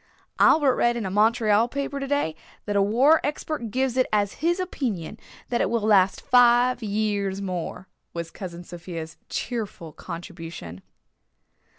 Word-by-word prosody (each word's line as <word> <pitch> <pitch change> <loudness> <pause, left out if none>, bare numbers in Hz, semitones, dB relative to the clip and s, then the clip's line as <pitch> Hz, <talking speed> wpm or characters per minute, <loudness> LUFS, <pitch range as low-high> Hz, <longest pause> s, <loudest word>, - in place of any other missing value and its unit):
"Albert 285 -5 +5
read 240 0 +2
in 225 - -3
a 190 - -3
Montreal 220 +1 +3
paper 280 +2 -3
today 275 - -1 0.3
that 205 - -2
a 200 - +4
war 255 +10 +4
expert 295 -4 -3
gives 255 +2 0
it 255 - +3
as 205 -2 +1
his 345 +3 +1
opinion 245 - -3 0.3
that 240 - 0
it - - +1
will 235 -1 0
last 200 -3 +3
five 245 0 +4
years 205 -2 -1
more," 185 -1 -5 0.2
was 170 -1 -5
Cousin 175 -2 -8
Sophia's 170 -2 -8
cheerful 210 -9 -4
contribution. 165 - -8
215 Hz, 145 wpm, -25 LUFS, 185-250 Hz, 0.3 s, Albert